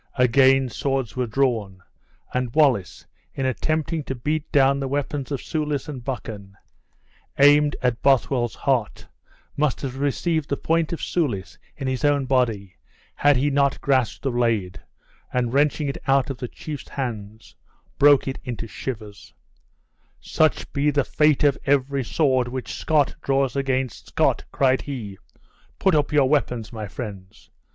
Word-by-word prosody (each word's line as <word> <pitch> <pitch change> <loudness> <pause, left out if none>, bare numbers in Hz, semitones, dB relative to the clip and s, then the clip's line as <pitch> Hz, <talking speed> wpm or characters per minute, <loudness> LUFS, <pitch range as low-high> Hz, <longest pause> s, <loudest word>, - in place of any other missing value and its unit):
Again 130 +1 +4
swords 135 -2 -2
were 125 -1 -1
drawn; 110 -7 -1 0.5
and 125 -2 -2
Wallace, 130 - +2 0.3
in 135 - -2
attempting 155 +4 -1
to 135 - -4
beat 150 +5 -3
down 140 -2 +4
the 135 - -2
weapons 140 0 -3
of 140 - -3
Soulis 150 -3 -2
and 135 -5 -7
Buchan, 105 -6 -6 0.8
aimed 145 +1 +5
at 125 -2 0
Bothwell's 130 -3 +2
heart, 125 -6 -1 0.5
must 150 -2 0
have 135 -1 -5
received 145 +2 -1
the 140 - -1
point 165 -1 0
of 170 - -4
Soulis' 125 - -2 0.2
in 135 - -4
his 130 +1 -2
own 145 -2 +2
body, 115 -8 0 0.4
had 145 -2 +3
he 145 +3 +1
not 140 0 +2
grasped 130 -6 0
the 135 - 0
blade, 115 -6 -1 0.5
and 125 -1 -1
wrenching 145 +1 +2
it 140 - -4
out 135 +1 +3
of 130 - -8
the 125 - -4
chief's 150 +4 -8
hand, 110 -5 -6 0.5
broke 145 -2 +6
it 135 - -3
into 120 -2 -5
shivers: 110 -3 -8 0.8
"Such 155 -1 0
be 145 +1 +2
the 145 -1 +2
fate 150 0 +2
of 145 -2 +3
every 140 0 +1
sword 130 -1 +1
which 130 +1 -5
Scot 150 -3 +1
draws 135 -2 0
against 130 -3 -2
Scot!" - - +1
cried 130 -1 +2
he. 110 -9 -7 0.6
"Put 190 - +2
up 150 -1 +2
your 145 -3 +4
weapons, 125 -6 -1
my 110 -2 -5
friends. 95 -3 -9
135 Hz, 150 wpm, -23 LUFS, 120-145 Hz, 0.8 s, broke